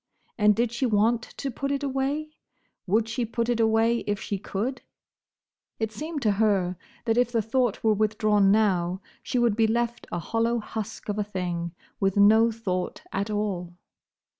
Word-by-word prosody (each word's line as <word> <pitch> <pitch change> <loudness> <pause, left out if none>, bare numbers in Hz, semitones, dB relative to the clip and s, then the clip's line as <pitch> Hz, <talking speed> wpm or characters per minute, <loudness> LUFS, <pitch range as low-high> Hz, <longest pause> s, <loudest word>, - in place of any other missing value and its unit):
And 210 -2 +4
did 235 +1 +1
she 245 +2 0
want 225 +2 +3
to 270 +2 -6
put 275 +4 -3
it 280 0 -1
away? 280 +3 -1 0.6
Would 215 +4 +2
she 240 +2 -2
put 235 +1 -2
it 240 -1 +1
away 225 +1 +3
if 205 -1 0
she 200 - -3
could? 225 +8 -3 1.0
It 220 -1 -2
seemed 300 +6 -5
to 215 - +4
her 195 -3 +2 0.3
that 230 0 +2
if 245 -1 +2
the 230 -2 +1
thought 240 0 0
were 220 -1 +4
withdrawn 210 -1 +3
now, 190 -3 +2 0.2
she 245 +1 -2
would 240 -3 +3
be 225 0 +3
left 235 +1 -1
a - - -2
hollow 230 +7 0
husk 220 -1 -6
of 205 0 -2
a - - +2
thing, 175 -4 -4 0.2
with 195 0 +1
no 220 +3 +6
thought 190 -5 -3
at 200 +2 -1
all. 195 -5 -2
220 Hz, 175 wpm, -26 LUFS, 200-235 Hz, 1.0 s, no